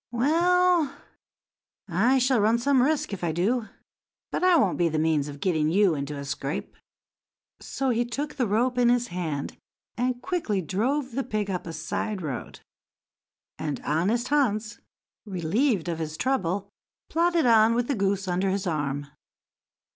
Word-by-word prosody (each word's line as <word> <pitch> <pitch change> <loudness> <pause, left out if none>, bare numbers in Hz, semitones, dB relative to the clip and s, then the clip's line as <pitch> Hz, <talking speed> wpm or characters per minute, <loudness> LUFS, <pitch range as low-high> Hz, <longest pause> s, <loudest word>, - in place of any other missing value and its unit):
"Well, 335 +5 +2 0.9
I 215 +9 +3
shall 255 -1 +3
run 220 +3 +3
some 265 +2 +3
risk 285 -4 +1
if 190 - -5
I 170 - +1
do, 215 +8 0 0.6
but - - -2
I 365 -1 +6
won't 205 - +2
be 170 -1 +3
the 155 - -2
means 155 -2 +1
of 145 -1 -8
getting 155 -4 +1
you 190 +1 +4
into 145 0 -4
a 140 - -6
scrape." 140 0 -4 0.8
So 270 -1 -2
he 240 0 +1
took 275 +5 -4
the 255 -5 0
rope 245 +5 +1
in 240 -1 +4
his 245 0 +2
hand, 160 -6 -4 0.4
and 250 0 -1
quickly 335 - -1
drove 250 - -1
the 270 +4 -2
pig 215 -5 -2
up 180 -2 -4
a - - -4
side 185 +5 -3
road; 140 -5 -6 1.0
and 150 -2 -3
honest 195 +11 0
Hans, 225 -7 0 0.4
relieved 195 - 0
of 165 -1 -2
his 155 -1 -4
trouble, 200 -5 -1 0.4
plodded 340 -1 +2
on 225 -1 +5
with 240 0 0
the 285 - 0
goose 195 -3 0
under 185 +2 0
his 195 +1 -1
arm. 145 -4 -2
210 Hz, 160 wpm, -26 LUFS, 170-255 Hz, 1.0 s, I